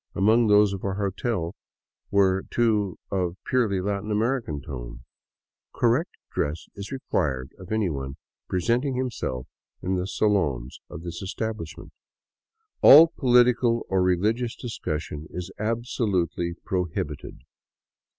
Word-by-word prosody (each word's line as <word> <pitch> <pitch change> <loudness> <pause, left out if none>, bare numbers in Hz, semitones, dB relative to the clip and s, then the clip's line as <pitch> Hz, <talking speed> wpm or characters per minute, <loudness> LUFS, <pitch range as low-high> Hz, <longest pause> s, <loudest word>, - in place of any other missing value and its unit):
Among 110 +4 +4
those 105 -1 +5
of 95 - -6
our 100 -1 -1
hotel 100 -2 -2 0.6
were 95 -1 +3
two 105 -5 +1
of 90 -2 -1
purely 115 -7 +1
Latin 100 +2 -2
American 110 - 0
tone: - - -8 0.4
" - - -67
Correct - - +3 0.2
dress 75 +3 -2
is 100 0 -8
required 70 - -1
of 90 +1 -11
anyone 75 -11 -1 0.3
presenting 120 +9 +1
himself 120 - -3 0.3
in 95 +1 -1
the 90 +1 -2
salons 80 - 0
of 80 - -8
this 85 -1 -6
establishment. 110 -3 -5 0.5
" 445 -1 -52
All 160 +4 +10
political 120 -2 +4
or 95 -1 +2
religious 105 +7 +1
discussion 80 - -5
is 90 +1 -6
absolutely 105 -7 -1
prohibited." 80 -6 -3
100 Hz, 120 wpm, -25 LUFS, 85-115 Hz, 0.6 s, All